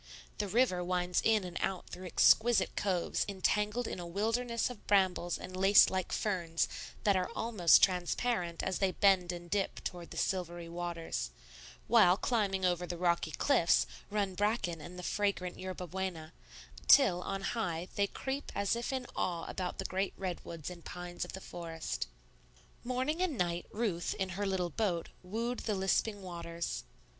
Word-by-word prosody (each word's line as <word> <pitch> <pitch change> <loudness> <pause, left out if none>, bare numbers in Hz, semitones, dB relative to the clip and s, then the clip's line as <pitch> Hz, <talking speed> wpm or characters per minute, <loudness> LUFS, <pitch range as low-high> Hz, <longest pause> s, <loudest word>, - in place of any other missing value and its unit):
The 205 - 0
river 195 -4 +2
winds 180 0 0
in 220 -2 +3
and 180 -1 -6
out 190 -2 -2
through 185 +1 -7
exquisite 230 +6 +4
coves 185 -4 0
entangled 210 +4 0
in - - -4
a 175 - -6
wilderness 230 +6 0
of 235 - -13
brambles 185 -3 +2
and 185 - -8
lace 195 +2 +7
like 185 -2 -2
ferns 170 -6 0 0.4
that 200 -2 +4
are 185 +2 0
almost 210 -8 +5
transparent 180 0 +1
as 190 - -1
they 190 -2 +2
bend 190 -2 +4
and 175 0 -7
dip 195 +2 -1
toward 175 -2 -5
the - - -9
silvery 175 -3 -2
waters; 170 -1 -3 0.6
while, 200 -6 +6
climbing 200 -5 0
over 180 0 +1
the 175 - -4
rocky 170 -2 +1
cliffs, 175 - +3 0.2
run 205 -2 0
bracken 200 -5 0
and 180 +4 -9
the 180 - -7
fragrant 200 -2 -1
yerba 185 -1 -5
buena, 180 -3 -4 0.5
till, 195 -11 +7
on 195 +1 -3
high, 175 -7 -2
they 200 0 +2
creep 270 +6 -4
as 200 +2 +1
if 235 +2 -3
in 260 -1 -2
awe 170 -2 -1
about 180 -1 -4
the 190 - -4
great 190 +1 -1
redwoods 175 -3 -5
and 170 -2 -10
pines 175 0 -5
of - - -7
the 190 - -5
forest. 165 - -5 0.8
Morning 260 +7 -1
and 340 -8 0
night 175 -2 -1
Ruth, 205 -7 -1
in 190 -1 -2
her 200 +3 -2
little 180 -3 -1
boat, 180 -3 -1
wooed 230 +6 -3
the 215 - -1
lisping 195 +2 0
waters. 170 - -5
185 Hz, 165 wpm, -33 LUFS, 175-210 Hz, 0.8 s, lace